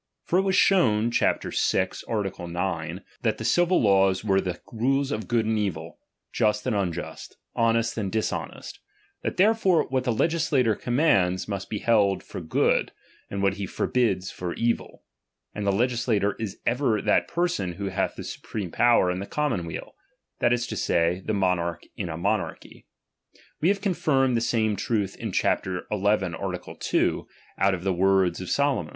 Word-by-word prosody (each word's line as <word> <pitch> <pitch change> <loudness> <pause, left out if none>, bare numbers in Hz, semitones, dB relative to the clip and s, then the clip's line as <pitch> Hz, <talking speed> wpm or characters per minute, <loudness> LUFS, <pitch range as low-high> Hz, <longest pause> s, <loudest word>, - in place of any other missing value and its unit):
For 180 - +2
it - - +4
was 190 -1 +1
shown 120 - +4
(chap. - - +1
vi. - - +1 0.2
art. 105 -4 -2
9) 85 0 -3 0.2
that 110 -2 0
the 110 - -5
civil 175 +8 +3
laws 95 -2 +3
were 95 -2 +2
the 90 -2 -4
rules 135 +4 +1
of 110 0 -3
good 115 -2 +1
and 110 0 +1
evil, 85 -5 -4 0.3
just 105 -1 +1
and 125 -4 0
unjust, 85 -4 -4 0.2
honest 115 0 +2
and 100 -3 -2
dishonest; 110 -1 -3 0.4
that - - -3
therefore 190 -5 +3
what 130 -1 0
the 125 - 0
legislator 145 -3 +2
commands, 100 - +1
must 100 -2 -4
be 105 - -2
held 105 -3 +2
for - - -7
good, 80 - +1 0.4
and 100 0 -3
what 100 +1 +2
he 100 -1 -3
forbids 95 -4 0
for 90 -1 -5
evil. 115 0 -2 0.5
And 105 -1 -3
the - - +4
legisla 120 +1 +1
tor 100 0 0
is 110 -4 -4
ever 120 -3 +1
that - - +2
person 170 - -1
who 100 +2 -4
hath 95 0 -1
the - - -7
supreme 100 -6 -6
power 120 -5 +4
in 90 - -3
the 100 - -5
commonweal, 120 - -3 0.5
that - - +3
li 120 - +4
to 120 -2 -4
say, 85 -1 +1
the 110 - -1
mo 95 -2 +3
narch 85 0 -4
in 95 -4 -4
a 80 - -4
monarchy. 100 +4 -3 0.7
We 165 - +3
have 200 0 +1
confirmed 135 - +1
the 115 - +1
same 110 -3 +1
truth 100 -3 -1
in 110 -3 -4
chap. - - +1
xi. 95 -1 -3 0.2
art. 95 -3 -1
2, - - 0 0.3
out 95 0 +3
of 90 - -8
the 95 -1 +1
words 95 -1 +2
of 90 - -6
Solo 140 -1 +2
DOMINION. 80 - -5
105 Hz, 180 wpm, -25 LUFS, 95-120 Hz, 0.7 s, it